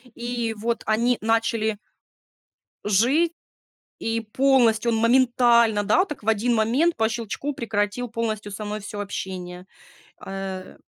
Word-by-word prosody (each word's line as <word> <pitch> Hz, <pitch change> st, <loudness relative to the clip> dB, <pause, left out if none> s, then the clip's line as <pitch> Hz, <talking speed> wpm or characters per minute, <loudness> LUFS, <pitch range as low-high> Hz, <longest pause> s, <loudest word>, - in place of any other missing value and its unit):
И 235 Hz, -1 st, -3 dB
вот 230 Hz, +2 st, -2 dB
они 235 Hz, +3 st, +2 dB
начали 225 Hz, -1 st, 0 dB, 1.1 s
жи 250 Hz, -, +3 dB, 0.7 s
и 225 Hz, 0 st, -1 dB
полностью 235 Hz, -1 st, +2 dB
он 225 Hz, -, +1 dB
моментально, 235 Hz, -2 st, +4 dB
да, 285 Hz, -, +3 dB
от 395 Hz, -, -4 dB
так 300 Hz, -, -7 dB
в 210 Hz, -, -8 dB
1 225 Hz, +2 st, +2 dB
момент 250 Hz, +10 st, +2 dB
по 220 Hz, -1 st, +2 dB
щелчку 235 Hz, +5 st, -4 dB
прекратил 220 Hz, 0 st, -2 dB
полностью 215 Hz, -3 st, -3 dB
со 210 Hz, +1 st, -6 dB
мной 210 Hz, +1 st, -4 dB
всё 205 Hz, +1 st, -7 dB
общение, 185 Hz, -2 st, -6 dB, 0.5 s
а, -, -, -10 dB, 0.3 s
э -, -, -14 dB
225 Hz, 135 wpm, -24 LUFS, 210-240 Hz, 1.1 s, моментально